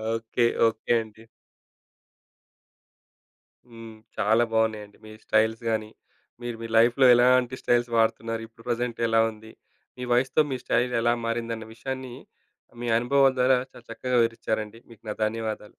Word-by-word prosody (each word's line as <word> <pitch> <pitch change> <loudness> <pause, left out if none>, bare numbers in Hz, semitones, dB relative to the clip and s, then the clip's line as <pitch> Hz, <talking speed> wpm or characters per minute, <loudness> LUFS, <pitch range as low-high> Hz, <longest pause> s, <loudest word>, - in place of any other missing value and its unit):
Okay. 115 +1 0 0.2
Okay 110 +1 -6
అండి. 110 +1 -17 2.5
హ్మ్, 115 -1 -11 0.2
చాలా 110 +3 +3
బావున్నాయండి. 110 -2 -1
మీ 110 - -11
స్టైల్స్ 110 +1 +1
గాని, 110 -1 -2 0.5
మీరు 120 -1 -5
మీ - - -4
లైఫ్‌లో 120 +3 +4
ఎలాంటి 125 +1 +3
స్టైల్స్ 120 0 +1
వాడుతున్నారు. 115 0 0
ఇప్పుడు 115 0 -20
ప్రెజెంట్ 120 0 -2
ఎలా 115 0 +3
ఉంది, 110 0 -14 0.5
మీ - - -7
వయస్సుతో 135 +5 +3
మీ 130 - -1
స్టైల్ 125 +1 0
ఎలా 120 0 +3
మారిందన్న 115 -1 -3
విషయాన్ని 130 +1 -6 0.7
మీ - - -3
అనుభవాల 135 +2 +3
ద్వారా 125 +1 +4
చాలా 120 - -16
చక్కగా 125 +2 -2
వివరిచ్చారండి. 115 -1 -3
మీకు 115 -2 -16
నా 105 - -3
ధన్యవాదాలు. 110 -1 -4
115 Hz, 135 wpm, -25 LUFS, 110-120 Hz, 2.5 s, లైఫ్‌లో